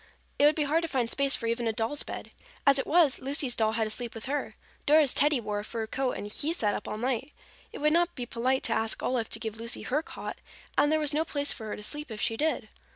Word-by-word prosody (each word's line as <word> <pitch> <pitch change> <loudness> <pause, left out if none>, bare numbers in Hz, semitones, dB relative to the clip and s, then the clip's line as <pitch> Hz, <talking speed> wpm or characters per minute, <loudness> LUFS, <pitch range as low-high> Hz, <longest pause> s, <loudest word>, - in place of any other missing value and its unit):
It 290 - +6
would 300 +1 +6
be 305 - +1
hard 305 +3 +2
to 330 - -2
find 250 -6 0
space 275 -1 +3
for 230 - -4
even 230 +1 0
a - - +2
doll's 225 +6 0
bed. - - -6 0.3
As 275 -1 +6
it - - -2
was, 315 -4 +4
Lucy's 270 -2 +2
doll 220 -1 +2
had 225 0 +1
to 215 - -2
sleep 240 +1 -3
with 225 - -7
her. 290 +2 -3 0.3
Dora's 300 -2 +6
Teddy 290 -1 +3
wore 210 -2 -3
a - - -5
fur 225 +1 -4
coat 255 +3 -1
and - - -5
he 285 +10 -1
sat 210 -11 +1
up - - -4
all - - -4
night. 255 +4 -2 0.4
It - - -8
would 300 +1 +3
not 345 +1 +2
be 245 - -4
polite 255 +3 0
to 230 - +1
ask 220 0 -1
Olive 240 -3 0
to 225 - -1
give 220 -1 -5
Lucy 230 +1 -2
her 290 +4 0
cot, - - -7 0.4
and 290 - +4
there 315 - +3
was 300 -1 +1
no 310 +2 +2
place 285 -3 0
for 220 - -8
her 210 - -3
to 210 - -9
sleep 295 +6 -2
if 220 -2 -6
she 225 - 0
did. 315 +7 0
260 Hz, 275 wpm, -29 LUFS, 225-295 Hz, 0.4 s, It